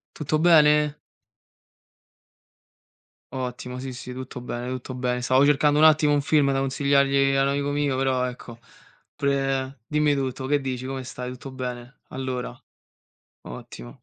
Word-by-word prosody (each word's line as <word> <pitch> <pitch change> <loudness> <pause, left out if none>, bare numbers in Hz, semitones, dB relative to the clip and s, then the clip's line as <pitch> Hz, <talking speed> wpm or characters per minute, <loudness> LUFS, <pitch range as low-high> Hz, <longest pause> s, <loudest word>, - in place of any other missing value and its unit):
Tutto 155 0 -1
bene? 150 -3 +5 2.4
Ottimo, 125 -1 -5
sì, 130 0 -6
sì, 125 0 -8
tutto 130 0 -7
bene, 120 0 -5
tutto 130 0 -5
bene. 125 0 -2
Stavo 130 +3 +3
cercando 145 +1 +3
un 155 - +7
attimo 155 -1 +5
un 145 - +2
film 140 -1 +2
da 135 - 0
consigliargli 140 0 +2
a 135 - +3
un 135 - +2
amico 140 0 -1
mio, 145 -2 0
però 130 -1 +1
ecco, 120 -1 -11 0.6
pure 135 -2 -1
dimmi 150 -1 +2
tutto. 130 -1 -3
Che 145 +1 +1
dici, 130 -1 -4
come 135 0 -4
stai? 125 0 -6
Tutto 130 +2 -9
bene? 125 0 -7
Allora. 130 - -5 0.9
Ottimo, - - -11
135 Hz, 145 wpm, -24 LUFS, 125-145 Hz, 2.4 s, un